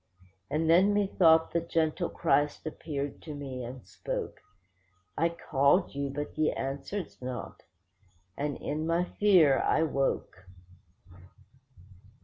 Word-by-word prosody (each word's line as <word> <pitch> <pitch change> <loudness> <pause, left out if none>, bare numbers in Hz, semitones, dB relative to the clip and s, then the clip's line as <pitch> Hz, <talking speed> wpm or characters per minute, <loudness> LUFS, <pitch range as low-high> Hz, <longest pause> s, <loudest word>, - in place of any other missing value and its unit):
And 160 +1 0
then 185 +5 +5
methought 170 -5 +4
the 170 - +1
gentle 165 0 0
Christ 145 -2 0
appeared 145 -2 -5
to 155 -2 -7
me, 135 -3 -6
and 125 +1 -8
spoke: - - -5 0.7
'I 165 - +2 0.2
called 140 +6 +3
you, 140 0 -2
but 145 +2 -5
ye 155 0 +2
answered 140 +8 -4
not'—and 95 - -8
in 155 +2 -3
my 170 +1 +2 0.2
fear 175 -10 +5
I 160 - +2
woke. 135 - -2
145 Hz, 115 wpm, -29 LUFS, 135-165 Hz, 0.7 s, then